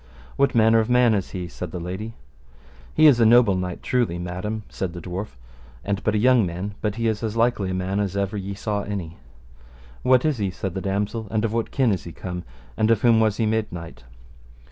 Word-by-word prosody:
What 140 -2 +2
manner 115 0 +5
a 110 - -3
man 125 -2 +5
is 100 -3 -1
he? 90 -2 -5
said 90 +1 -7
the 90 - -6
lady. 95 +6 -6 0.8
He 155 - +5
is 140 -6 +7
a - - +5
noble 115 -2 +6
knight, 90 -1 -4
truly, 120 -9 0
madam, 90 +5 -4
said 90 -3 -4
the 90 - -6
dwarf, 90 -3 -6 0.5
and 100 -1 -2
but 110 - +1
a - - +3
young 125 +1 +4
man, 90 +3 -4
but 105 -2 -1
he 115 0 -2
is 110 -2 -1
as 110 -1 -3
likely 115 -5 +1
a - - -2
man 95 +2 -1
as 100 -1 -1
ever 100 +1 -1
ye 100 0 -4
saw 105 0 -2
any. 95 -5 -5 0.8
What 130 +1 +4
is 150 -6 +1
he? 100 -2 0
said 95 0 -5
the 95 - -4
damosel, 105 +3 -2
and 110 +1 0
of 110 - -2
what 115 -1 -1
kin 130 -5 +2
is 95 - -2
he 85 - -8
come, 90 -1 -6 0.3
and 110 0 +1
of 115 -2 +2
whom 115 -2 +5
was 110 -2 +2
he 115 - +1
made 110 0 0
knight? 85 -7 -9
105 Hz, 230 wpm, -23 LUFS, 95-115 Hz, 0.8 s, is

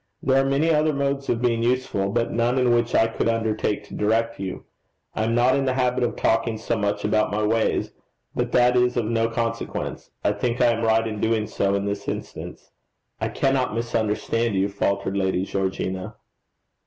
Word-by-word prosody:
There 135 0 +4
are 135 - 0
many 145 +4 +2
other 155 0 +2
modes 140 0 -1
of 120 0 0
being 115 -2 +2
useful; 120 -5 0
but 115 +3 0
none 120 +2 +1
in 125 -2 +3
which 120 0 +1
I 110 - +5
could 115 0 -1
undertake 110 -2 -1
to 100 - -14
direct 115 +2 0
you. 95 -2 -5 0.5
I 110 - -1
am 115 +1 0
not 125 +2 +4
in 140 - 0
the 130 -1 0
habit 125 -1 +1
of 120 - -1
talking 115 0 +1
so 115 +2 -2
much 105 -2 -1
about 105 0 +2
my 105 +1 -1
ways 110 +1 +1 0.4
but - - -2
that 125 0 +4
is 125 0 +2
of 120 - +1
no 115 0 +1
consequence. 115 0 -3
I - - +3
think 115 +4 -2
I 120 -1 +5
am 115 - -3
right 115 0 +3
in 105 -2 -5
doing 110 -1 +1
so 100 -1 0
in 100 0 -1
this 100 0 -4
instance.' - - -6 0.5
'I - - -1
cannot 135 -4 0
misunderstand 115 -1 -1
you,' 95 +1 +1
faltered 100 0 -1
Lady 95 -1 0
Georgina. 95 -1 -3
115 Hz, 195 wpm, -24 LUFS, 105-125 Hz, 0.5 s, I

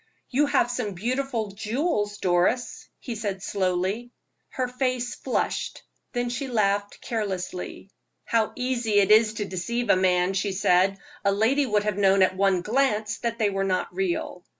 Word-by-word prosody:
"You 285 +3 +3
have 245 -3 +2
some 220 -6 -3
beautiful 240 +1 -2
jewels, 210 - -1
Doris," 180 +8 0
he 245 - -6
said, 205 -3 -4
slowly. 190 +5 -1 0.4
Her 255 -1 -2
face 250 -1 -1
flushed, - - -2 0.3
then 245 -1 -1
she 270 +3 -3
laughed 205 -4 0
carelessly. 195 -3 -4 0.3
"How 225 -2 +1
easy 245 -3 -1
it 200 0 +4
is 215 0 +5
to 210 - -2
deceive 220 +5 -1
a - - +6
man," 185 0 +2
she 195 +1 -1
said; 190 0 +3 0.3
"a 200 - +3
lady 240 +8 +2
would 210 -2 +2
have 210 -1 -1
known 195 -1 +5
at 185 0 +2
one 190 -2 +2
glance 215 -2 0
that 235 -1 -2
they 215 -3 +1
were 195 0 -1
not 185 -2 -1
real." 180 -1 -2
210 Hz, 160 wpm, -25 LUFS, 190-245 Hz, 0.4 s, a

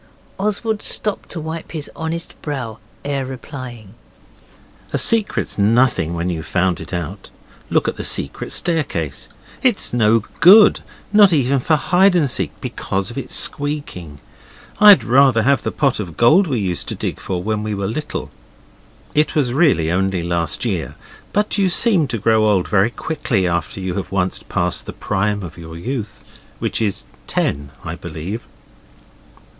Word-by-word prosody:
Oswald 210 +2 -1
stopped 210 -2 -2
to 170 - -6
wipe 160 +2 -6
his 155 -3 -4
honest 165 +1 -4
brow 125 -7 -5 0.3
ere 140 -1 -1
replying. 130 -5 -8 1.0
'A - - 0
secret's 220 - +1
nothing 105 -6 +2
when 85 +1 -2
you've 85 -2 -4
found 90 -1 0
it 80 - -10
out. 90 +2 -5 0.4
Look - - +1
at - - -2
the - - -5
secret - - 0
staircase. 140 - -1 0.3
It's 245 - +1
no 115 -1 +3 0.2
good, 200 +7 +8 0.3
not 205 -2 +7
even 135 -2 +2
for 155 +5 +2
hide 180 +5 +3
and 160 -5 +3
seek, 95 - +1
because 95 +3 -3
of 120 - -10
its - - -2
squeaking. 140 - -1 0.6
I'd 210 -2 +8
rather 130 -2 +4
have 140 +3 +3
the - - -2
pot 140 -6 0
of 85 -6 -6
gold 165 +12 +5
we 135 -5 -1
used 90 -4 -3
to - - -3
dig - - -4
for 90 -2 -4
when 110 +1 -1
we 105 -1 -3
were 100 0 -3
little.' 145 +9 -4 0.8
It 150 +1 +1
was 130 -6 +1
really 130 - +3
only 95 -1 0
last 85 +5 -1
year, 85 - -2 0.4
but 210 0 0
you 195 -2 +3
seem 180 -4 +3
to 120 - -2
grow 110 +1 +3
old 95 -4 +2
very 100 +1 +3
quickly 120 - -2
after 85 +2 -2
you 95 -1 -3
have 95 0 -5
once 95 -1 0
passed - - -2
the - - -6
prime 105 +1 -1
of 85 -1 -9
your 80 0 -9
youth, 115 +3 -6 0.2
which - - -2
is 105 -4 -1
at - - -29
ten, 70 0 -1
I - - -5
believe. 95 +9 -6
115 Hz, 165 wpm, -19 LUFS, 95-155 Hz, 1.0 s, good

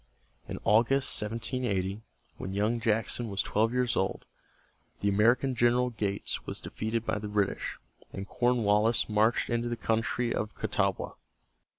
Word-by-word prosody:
In - - -5
August, 120 +6 +3
1780, 105 -3 -2 0.4
when 95 - -5
young 105 +4 +1
Jackson 115 +1 0
was 100 -1 -1
twelve 110 +2 +1
years 125 -1 +1
old, 95 - -1 0.8
the 100 - +2
American 120 +6 +3
General 120 +1 +3
Gates 100 -3 -2
was - - -4
defeated 110 +1 -3
by 105 - -1
the 105 - -5
British, 105 -1 -1 0.3
and 95 0 -6
Cornwallis 115 -2 +2
marched 110 +3 +2
into 120 0 0
the 120 - -2
country 115 +2 0
of 105 0 -3
the - - -24
Catawba. - - 0
115 Hz, 145 wpm, -29 LUFS, 105-120 Hz, 0.8 s, August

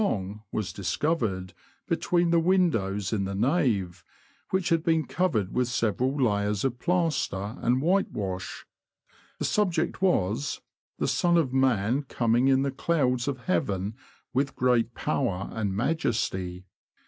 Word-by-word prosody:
long, 105 - -2
was 105 -4 -3
discovered, 95 - -1 0.3
between 175 -1 +1
the 170 - +5
windows 115 - +1
in 100 -3 0
the 95 0 -3
nave, 100 - +1 0.5
which 190 -2 0
had 165 -1 +2
been 160 -2 +2
covered 125 - 0
with 125 -1 +1
several 120 +3 0
layers 105 -3 +1
of 125 -2 -1
plaster 150 - 0
and 125 +3 +2
whitewash 105 - -1 0.7
The - - -2
subject 180 -6 0
was, 135 - +1 0.4
''The - - 0
Son 175 -1 +3
of 140 -6 +1
Man 130 -1 +2
coming 120 -2 +1
in 135 0 +4
the 140 - 0
clouds 130 -4 0
of 135 -3 -2
Heaven 95 +3 0 0.4
with 135 +1 0
great 120 -2 +2
power 115 -10 -1
and 100 -3 -2
majesty." 105 - -1
125 Hz, 135 wpm, -27 LUFS, 100-160 Hz, 0.7 s, the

